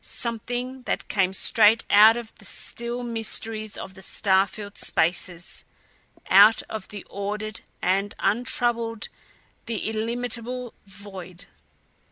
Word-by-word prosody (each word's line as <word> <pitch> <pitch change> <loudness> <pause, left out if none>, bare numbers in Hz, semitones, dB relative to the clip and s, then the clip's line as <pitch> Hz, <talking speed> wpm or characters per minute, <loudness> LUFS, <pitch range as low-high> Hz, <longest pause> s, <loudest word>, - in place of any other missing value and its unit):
Something 245 +3 -3
that - - -2
came 190 -3 +2
straight 215 +3 +5
out 215 +3 +7
of 235 -2 -7
the 205 - -13
still 235 +4 -5
mysteries 225 -2 -1
of 190 - -7
the 190 - -13
star 190 0 +2
filled 205 0 -9
spaces; 175 +1 0 0.6
out 205 +4 +7
of 215 -3 -7
the 205 -2 -9
ordered, 210 +2 -4 0.3
the 195 +2 +1
untroubled, 230 +1 0 0.6
the 225 -3 -2
illimitable 240 +2 -3
void. 190 -2 -10
215 Hz, 115 wpm, -25 LUFS, 200-235 Hz, 0.6 s, out